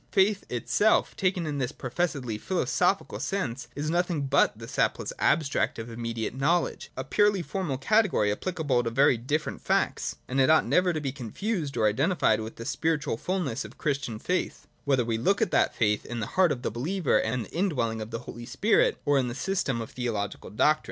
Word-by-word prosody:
Faith 200 +1 +2
itself, 205 - +2
taken 185 -2 0
in 145 -2 -3
this 130 0 -1
professedly 130 -4 -2
philosophical 180 - 0
sense, 135 -11 -3
is 145 +1 -3
nothing 175 -2 0
but 140 -5 +3
the 115 0 -9
sapless - - -1
abstract 155 -3 +1
of 115 +1 -6
immediate 115 -1 -3
know 150 +7 +3
ledge, - - -7
— - - -37
a - - -2
purely 205 -3 +2
formal 175 -7 -3
category 185 - +2
applicable 145 - 0
to 115 - -1
very 135 +3 +4
different 145 +7 -2
facts; - - 0
and 135 +1 +1
it 130 - +4
ought 160 - +5
never 180 0 +3
to 160 - -2
be 140 -3 -3
confused 145 - -3
or 110 - +2
identified 120 - +2
with 110 +1 -6
the 115 - -8
spiritual 160 -4 0
fulness 175 -3 -2
of 110 +3 -12
Christian 135 -7 -2
faith, 180 +11 -2 0.2
whether 135 -4 +2
we 115 -1 -1
look 195 - +2
at - - +1
that - - +2
faith 105 -2 +1
in 120 0 -5
the 110 - -2
heart 185 -3 +4
of 125 - -3
the - - -1
believer 160 - +1
and 115 0 -2
the - - -14
in 190 +4 +2
dwelling 115 -7 -1
of 110 - -6
the 115 - -5
Holy 120 0 -8
Spirit, 465 - +2
or 145 -1 +4
in 130 - 0
the 120 - -4
system 150 -7 -1
of 115 - -7
theological 110 -5 -3
doctrine. 150 +8 +3
140 Hz, 205 wpm, -27 LUFS, 115-180 Hz, 0.2 s, ought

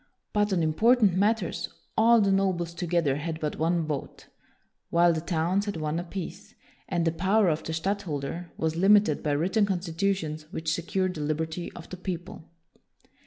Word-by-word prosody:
But 210 0 +2
on 175 -4 +2
important 215 +6 +4
matters 200 -1 0 0.3
all 230 +1 +5
the 200 -1 +3
nobles 185 -3 +1
together 170 -5 0
had 160 +1 -4
but 150 -2 -3
one 165 +1 +1
vote, 150 -3 -5 0.6
while 170 0 +4
the 160 - -2
towns 175 +4 0
had 200 - -3
one 155 +1 -2
apiece, 180 +2 -7 0.3
and 175 -3 0
the 165 - +3
power 190 +4 +2
of 155 0 0
the - - -5
stadtholder 170 -2 -3
was 160 0 -1
limited 195 -3 +4
by 150 - 0
written 190 +8 +2
constitutions 170 -4 -2
which 160 -1 -2
secured 185 +2 -1
the 155 - -6
liberty 160 +3 -2
of 170 - -10
the 185 - -7
people. 175 -2 -6
175 Hz, 165 wpm, -27 LUFS, 160-195 Hz, 0.6 s, all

